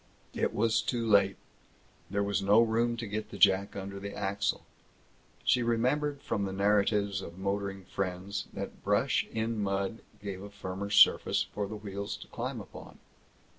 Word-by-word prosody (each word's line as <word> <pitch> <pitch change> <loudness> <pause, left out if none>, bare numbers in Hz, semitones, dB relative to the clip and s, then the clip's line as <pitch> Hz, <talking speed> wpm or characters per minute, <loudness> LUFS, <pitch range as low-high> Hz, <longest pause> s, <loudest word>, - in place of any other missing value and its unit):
It - - 0
was 115 +1 +3
too 120 -2 -1
late. 100 -2 +4 0.7
There 100 +1 0
was 100 0 0
no 100 +3 +5
room 115 +1 +2
to 115 - -4
get 105 +1 -4
the - - -8
jack 100 0 +4
under 100 0 -5
the 100 +1 -6
axle. 100 +1 -1 0.8
She 125 - +3
remembered 135 +5 0
from 100 - -1
the 95 - -3
narratives 100 0 +2
of 85 -1 -9
motoring 100 0 -3
friends 95 +2 -3
that - - -6
brush - - +2
in 110 0 -1
mud 100 +2 -1 0.2
gave 100 -2 -6
a 100 - -8
firmer 100 0 -5
surface 105 - +5
for 105 -1 -4
the 110 - -6
wheels 100 -1 -5
to - - -12
climb - - -4
upon. - - -11
100 Hz, 165 wpm, -30 LUFS, 100-110 Hz, 0.8 s, no